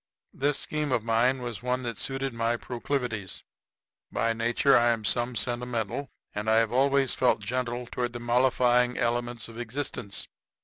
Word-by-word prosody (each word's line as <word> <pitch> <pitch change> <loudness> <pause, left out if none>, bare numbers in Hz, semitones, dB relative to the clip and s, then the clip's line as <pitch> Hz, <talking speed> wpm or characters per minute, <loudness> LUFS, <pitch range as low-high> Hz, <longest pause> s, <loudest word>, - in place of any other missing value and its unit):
This 140 +1 +1
scheme 150 -2 -2
of 120 -4 +1
mine 120 +3 +2
was 120 -3 -5
one 125 +1 -1
that 115 -2 -3
suited 135 +5 -2
my 115 +1 0
proclivities. 120 -5 -3 0.7
By 115 - +1
nature 120 +4 +3
I 120 0 +5
am 115 -2 0
some 120 +2 +1
sentimental, 120 +2 -2 0.2
and 105 +1 -4
have 110 0 +4
always 135 +1 +3
felt 125 -4 +2
gentle 120 +2 -2
toward 120 0 -3
the 120 - -5
mollifying 125 0 +3
elements 120 0 -1
of 115 0 -10
existence. 120 -4 -4
120 Hz, 150 wpm, -28 LUFS, 115-130 Hz, 0.7 s, I